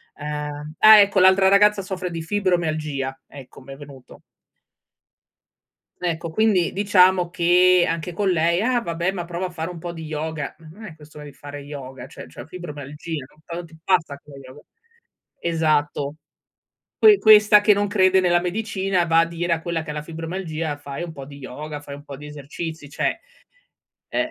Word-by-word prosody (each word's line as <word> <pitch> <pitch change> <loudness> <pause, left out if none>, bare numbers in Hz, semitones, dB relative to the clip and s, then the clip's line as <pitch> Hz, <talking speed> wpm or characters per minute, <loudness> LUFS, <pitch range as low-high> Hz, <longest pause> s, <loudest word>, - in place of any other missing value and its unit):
uhm, 150 0 -6
ah, 215 -1 +9
ecco, 200 -1 +4
l'altra 190 +1 +5
ragazza 205 +1 +4
soffre 185 -1 -5
di 165 -1 -5
fibromialgia, 155 -7 -2
ecco, 135 -1 -13
mi 135 +1 -11
è - - -10
venuto. 140 -3 -14 1.8
Ecco, 170 -2 -3
quindi 200 -3 +2
diciamo 185 -3 +3
che 180 +1 +4
anche 165 +1 -3
con 195 +3 0
lei: 170 0 +2
“Ah 245 +1 +1
vabbè, 170 -1 -2
ma 180 -3 -5
prova 175 +2 -4
a - - -4
fare 165 -1 -5
un 175 -2 -8
po' 175 +1 -6
di 165 -1 -8
yoga.” 155 -1 -4
Non 165 +7 -14
è 160 -6 -10
questione 150 -1 -13
di 145 - -11
fare 145 +1 -10
yoga, 135 -3 -9
cioè, - - -11
c'è 100 +10 -11
fibromialgia, 150 -3 -7
no 155 - -26
quando 170 0 -6
ti 160 -1 -17
passa 165 -7 +1
con 145 - -15
yoga? 130 +2 -13 0.8
Esatto. 155 -3 0 0.8
Que 425 -2 +7
questa 210 -1 +7
che 210 0 +5
non 205 +1 0
crede 190 -2 +3
nella 175 -1 +3
medicina 190 -1 -1
va 165 0 +3
a 165 - +4
dire 170 +1 -2
a 165 - -3
quella 170 -1 -3
che 155 - -11
ha - - -6
la 150 - -4
fibromialgia: 165 -1 -5
“Fai 145 +2 -7
un 170 -2 -7
po' 140 -3 -9
di 140 0 -12
yoga, 150 +3 -7
fai 140 -1 -9
un 145 - -13
po' 140 -2 -9
di 150 - -11
esercizi." 150 +1 -7
Cioè, 150 - -2 0.9
eh. - - -1
165 Hz, 180 wpm, -22 LUFS, 150-185 Hz, 1.8 s, ah